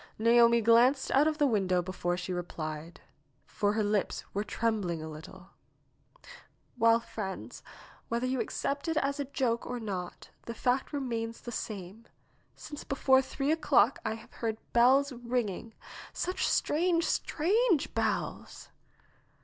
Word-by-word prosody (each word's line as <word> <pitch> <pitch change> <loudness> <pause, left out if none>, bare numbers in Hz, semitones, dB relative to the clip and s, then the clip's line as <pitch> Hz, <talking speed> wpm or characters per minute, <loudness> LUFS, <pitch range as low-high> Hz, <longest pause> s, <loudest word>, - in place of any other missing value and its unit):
Naomi 235 +1 +5
glanced 240 +5 +4
out 285 +3 +4
of 310 -1 0
the 295 - +3
window 195 -8 +2
before 175 -1 -2
she 185 0 -4
replied, 165 -2 -6 0.4
for 205 0 0
her 215 0 +1
lips 205 -1 -1
were 205 - -1
trembling 210 -7 -1
a 155 - -6
little. 160 +5 -11 1.3
^'Well, 230 +1 +4
friends, 215 -5 -6 0.5
whether 235 +2 -1
you 255 0 0
accept 280 +2 -3
it 325 -1 0
as 280 -1 0
a 285 - -1
joke 250 -4 -1
or 250 -1 -4
not, 190 -5 -6 0.2
the 235 - -5
fact 250 +3 0
remains 230 -5 -3
the 240 - -7
same. 210 -1 -6 0.5
Since 295 -1 -9
before 265 -1 +3
three 275 +2 -2
o'clock 290 -6 +3
I 220 - -2
have 225 - -14
heard 225 -2 -3 0.2
bells 265 +4 +5
ringing; 235 -3 -3 0.4
such 365 - -1
strange, 335 +2 +2
strange 375 - +1
bells - - -3
235 Hz, 140 wpm, -30 LUFS, 205-275 Hz, 1.3 s, Naomi